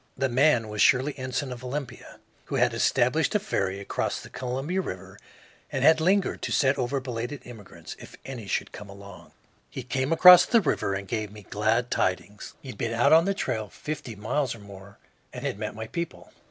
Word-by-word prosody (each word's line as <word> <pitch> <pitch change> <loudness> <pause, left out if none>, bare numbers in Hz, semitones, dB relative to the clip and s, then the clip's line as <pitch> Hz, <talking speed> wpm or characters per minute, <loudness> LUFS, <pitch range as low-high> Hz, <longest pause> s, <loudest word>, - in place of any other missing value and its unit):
The 135 0 0
man 125 -2 +3
was 105 0 -3
Shirley 140 +2 +4
Ensign, 130 0 -3
of 125 0 -8
Olympia, 130 0 -6 0.3
who - - -4
had - - +2
established - - +1
a - - +4
ferry 95 +1 -2
across 100 - -2
the - - -12
Columbia 135 +9 -2
River 95 - -8 0.5
and 135 - -2
had 160 +2 +6
lingered 190 +3 +1
to - - -3
set 135 -1 +3
over 130 +2 -1
belated 125 +1 -5
immigrants, 115 -5 -11
if - - -12
any 125 -6 -7
should - - -2
come 105 -1 -10
along. 100 -1 -12 0.4
He - - -7
came 130 +3 -2
across 180 +2 +9
the 235 - +5
river 135 - 0
and 100 0 -5
gave 110 -2 -3
me 105 -1 -12
glad 110 +5 0
tidings. 100 +3 -2
He 135 - -9
had - - -9
been 115 0 -2
out 120 +6 +4
on 165 +1 +6
the 200 0 0
trail 110 - -3
fifty 150 -4 -6
miles 120 +5 -1
or - - -13
more 100 0 -13 0.3
and - - -7
had 100 - -3
met 105 0 -4
my 110 +1 -5
people. 170 +8 -6
125 Hz, 200 wpm, -26 LUFS, 105-140 Hz, 0.5 s, across